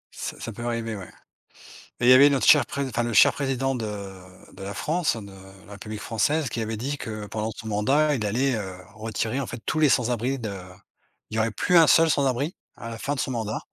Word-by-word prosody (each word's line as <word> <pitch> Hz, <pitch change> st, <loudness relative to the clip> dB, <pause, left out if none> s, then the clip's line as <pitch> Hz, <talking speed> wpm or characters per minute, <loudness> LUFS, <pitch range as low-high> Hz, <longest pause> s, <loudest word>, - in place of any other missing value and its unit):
Ça -, -, -6 dB
ça 115 Hz, -, -5 dB
peut 120 Hz, +3 st, -8 dB
arriver, 115 Hz, -2 st, -3 dB
ouais. 95 Hz, -3 st, -9 dB, 0.9 s
Mais, 120 Hz, -, 0 dB
il -, -, +8 dB
y -, -, +10 dB
avait 140 Hz, +3 st, +8 dB
notre 140 Hz, -2 st, +1 dB
cher 150 Hz, -, +7 dB
Pré 140 Hz, 0 st, -3 dB
enfin, 120 Hz, -2 st, -2 dB
le 120 Hz, 0 st, -2 dB
cher -, -, +6 dB
Président 135 Hz, -1 st, -1 dB
de 120 Hz, -4 st, -3 dB, 0.7 s
de 95 Hz, -, -13 dB
la 100 Hz, +1 st, -5 dB
France, 165 Hz, -2 st, 0 dB
de 100 Hz, -3 st, -9 dB, 0.3 s
la 105 Hz, -, -15 dB
République 105 Hz, +1 st, -7 dB
française, 140 Hz, +8 st, 0 dB
qui 115 Hz, -, -3 dB
avait 110 Hz, 0 st, -3 dB
dit 140 Hz, +6 st, -3 dB
que 110 Hz, -1 st, -6 dB
pendant 110 Hz, +1 st, -3 dB
son 110 Hz, -, -9 dB
mandat, 135 Hz, +9 st, +2 dB
il 115 Hz, -, -3 dB
allait, 125 Hz, +5 st, +1 dB
heu, 95 Hz, -4 st, -5 dB, 0.2 s
retirer, 110 Hz, +3 st, -3 dB
en 135 Hz, -, -3 dB
fait, 120 Hz, -, -6 dB
tous 155 Hz, -, -1 dB
les 155 Hz, -2 st, +5 dB
sans-abris 125 Hz, +1 st, +1 dB
de 110 Hz, -5 st, -5 dB, 0.8 s
il 110 Hz, -, -3 dB
y -, -, +2 dB
aurait 110 Hz, +1 st, +2 dB
plus 180 Hz, -, +2 dB
un 165 Hz, -2 st, +7 dB
seul 165 Hz, +2 st, +5 dB
sans-abri 140 Hz, +3 st, 0 dB, 0.2 s
à 115 Hz, -, -8 dB
la 115 Hz, -, -6 dB
fin 145 Hz, +4 st, -2 dB
de -, -, -6 dB
son 130 Hz, -, -1 dB
mandat. 110 Hz, -3 st, -3 dB
120 Hz, 235 wpm, -25 LUFS, 110-140 Hz, 0.9 s, y